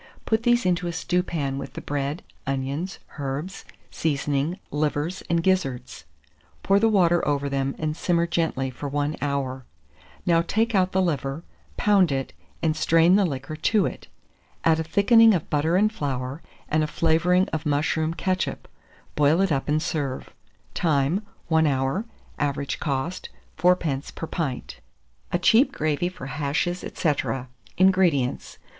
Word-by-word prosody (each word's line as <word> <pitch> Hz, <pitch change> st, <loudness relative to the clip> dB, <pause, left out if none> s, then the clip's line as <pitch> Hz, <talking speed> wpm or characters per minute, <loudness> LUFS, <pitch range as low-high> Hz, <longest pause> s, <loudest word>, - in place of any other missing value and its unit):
Put 220 Hz, 0 st, +1 dB
these 240 Hz, -1 st, +2 dB
into 180 Hz, -1 st, +1 dB
a -, -, -1 dB
stewpan 165 Hz, -5 st, -1 dB
with -, -, -7 dB
the -, -, -6 dB
bread, 145 Hz, +2 st, -3 dB, 0.2 s
onion, 135 Hz, +5 st, -2 dB, 0.3 s
herbs, 145 Hz, +7 st, -4 dB, 0.3 s
seasoning, 145 Hz, +2 st, -1 dB
livers, 150 Hz, +4 st, -1 dB
and 170 Hz, -1 st, +1 dB
gizzards; 185 Hz, -10 st, -1 dB, 0.6 s
pour 195 Hz, +1 st, +4 dB
the 225 Hz, +2 st, +4 dB
water 175 Hz, -5 st, +3 dB
over 145 Hz, -1 st, 0 dB
them 135 Hz, 0 st, -1 dB
and 155 Hz, -1 st, -2 dB
simmer 170 Hz, 0 st, +1 dB
gently 160 Hz, -6 st, -1 dB
for 140 Hz, +3 st, -6 dB
1 145 Hz, +2 st, -1 dB
hour. 135 Hz, -2 st, -2 dB, 0.6 s
Now 165 Hz, -1 st, +4 dB
take 225 Hz, +7 st, 0 dB
out 185 Hz, -2 st, +2 dB
the 190 Hz, 0 st, +2 dB
liver, 145 Hz, -2 st, -2 dB, 0.3 s
pound 195 Hz, -6 st, +4 dB
it, 135 Hz, -1 st, -2 dB, 0.3 s
and 155 Hz, -1 st, +2 dB
strain 165 Hz, +3 st, +4 dB
the 200 Hz, -2 st, +4 dB
liquor 135 Hz, 0 st, -5 dB
to 195 Hz, +5 st, +2 dB
it. -, -, -6 dB, 0.6 s
Add 165 Hz, -1 st, +3 dB
a -, -, 0 dB
thickening 220 Hz, +6 st, +5 dB
of 165 Hz, -, -4 dB
butter 150 Hz, +3 st, +2 dB
and 215 Hz, +3 st, +3 dB
flour, 135 Hz, -3 st, -3 dB, 0.3 s
and 155 Hz, 0 st, +1 dB
a -, -, 0 dB
flavouring 170 Hz, +5 st, +2 dB
of 155 Hz, -1 st, -3 dB
mushroom 155 Hz, +2 st, 0 dB
ketchup; 185 Hz, +1 st, -2 dB, 0.5 s
boil 150 Hz, +3 st, +3 dB
it 195 Hz, -2 st, +2 dB
up 135 Hz, 0 st, -1 dB
and 150 Hz, +1 st, +2 dB
serve. 140 Hz, -5 st, -3 dB, 0.4 s
Time. 155 Hz, +3 st, +1 dB, 0.3 s
1 160 Hz, -1 st, +3 dB
hour. 135 Hz, +9 st, 0 dB, 0.3 s
Average 140 Hz, -1 st, -1 dB
cost, 145 Hz, +5 st, -3 dB, 0.3 s
4d. 160 Hz, -5 st, +1 dB
per -, -, -4 dB
pint. 155 Hz, -6 st, -4 dB, 0.5 s
A -, -, +2 dB
CHEAP 225 Hz, +9 st, +4 dB
GRAVY 155 Hz, +3 st, -1 dB
FOR 175 Hz, -7 st, -10 dB
HASHES, 150 Hz, +6 st, -1 dB
&c. -, -, -6 dB, 0.2 s
440. 130 Hz, -2 st, -3 dB, 0.3 s
INGREDIENTS. 180 Hz, -9 st, +2 dB
160 Hz, 150 wpm, -24 LUFS, 140-180 Hz, 0.6 s, thickening